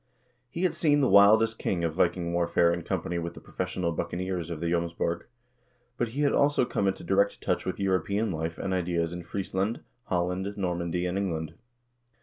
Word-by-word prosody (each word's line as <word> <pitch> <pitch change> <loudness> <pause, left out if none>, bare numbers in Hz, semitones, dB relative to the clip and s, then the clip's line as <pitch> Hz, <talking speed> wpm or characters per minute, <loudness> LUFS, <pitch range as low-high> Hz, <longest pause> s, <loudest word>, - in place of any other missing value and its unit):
He 170 +8 -4
had 185 - +2
seen 145 -3 +3
the 135 - +3
wildest 110 +3 +6
kind 85 -3 -1
of 80 -2 0
Viking 85 0 +1
warfare 85 0 +3
in 85 - -3
company 85 -1 -2
with 85 0 -5
the - - -9
professional 90 -2 -3
buccaneers 90 +1 -3
of 85 -3 -4
the 85 - -3
Jomsborg, 85 0 -1 0.7
but 120 - 0
lie 145 - +1
had 145 - +3
also 140 -3 +3
come 100 - 0
into 95 0 -1
direct 95 +3 +2
touch - - -1
with - - -3
European 100 +3 0
life 80 0 -3
and 95 - -2
ideas 85 -2 0
in 90 - -5
Friesland, 95 +4 -2 0.2
Holland, 90 +3 -1
Normandy, 90 -2 -1
and 90 +2 -1
England. 80 -5 -2
90 Hz, 180 wpm, -28 LUFS, 85-100 Hz, 0.7 s, wildest